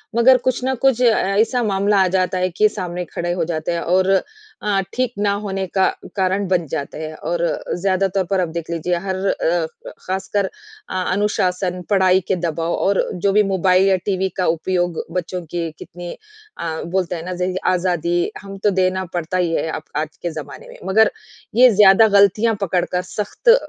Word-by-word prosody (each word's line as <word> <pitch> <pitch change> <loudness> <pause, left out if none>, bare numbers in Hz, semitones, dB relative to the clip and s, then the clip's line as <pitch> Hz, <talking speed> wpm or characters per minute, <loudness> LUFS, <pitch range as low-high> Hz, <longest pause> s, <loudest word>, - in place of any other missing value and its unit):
मगर 250 +2 +6
कुछ 255 +1 -1
न 265 - +1
कुछ 265 -3 +3
अ, - - +5
ऐसा 220 +6 +1
मामला 200 -1 +1
आ - - +2
जाता 185 0 0
है 185 0 +1
कि 210 +5 +3
सामने 180 -3 -4
खड़े 175 +1 -3
हो 175 -2 -1
जाते 160 0 -2
हैं 170 -1 -1
और 185 +2 +2 0.6
अ, 200 -2 +2
ठीक 255 -1 -1
ना 205 -1 +2
होने 195 -1 -2
का 190 +1 +2 0.3
कारण 190 0 0
बन 180 -2 +1
जाते 140 0 -4
हैं। 155 0 -5
और 170 +3 -3 0.4
ज़्यादा 190 +1 +1
तौर 195 - +2
पर 195 +2 0
आप 180 - 0
देख 165 -1 -5
लीजिए 170 +1 -1
हर 190 - -1
अ, 170 -2 +1 0.4
खासकर 190 +2 -1 0.4
अ, 185 - -1
अनुशासन, 185 -2 0
पढ़ाई 190 -2 +4
के - - +2
दबाव 170 -1 -2
और 200 0 +1
जो 195 +2 0
भी 210 +1 +5
मोबाइल 190 0 +3
या 190 - +4
टीवी 190 -1 0
का 185 - +1
उपयोग 175 +1 0
बच्चों 180 +1 -3
के 170 -1 -2
कितनी 175 0 -8 0.5
अ, 160 -1 -3
बोलते 180 0 -1
हैं 165 - -6
ना 185 - -4
ज 180 +1 0 0.2
आज़ादी 175 -1 0
हम 195 0 -9
तो 210 - +5
देना 185 0 +1
पड़ता 175 +1 -2
ही 175 -2 +1
है 160 - 0
अप 155 - -5
आज 155 +1 -3
के 175 - -2
ज़माने 150 -3 -8
में। - - -12
मगर 215 +3 +4 0.4
ये 250 +2 +8
ज़्यादा 205 +2 +7
गलतियाँ 210 +3 +4
पकड़ 180 -2 +1
कर 180 - -2
सख़्त 210 - -2
अ 470 - +10
185 Hz, 195 wpm, -20 LUFS, 175-200 Hz, 0.6 s, अ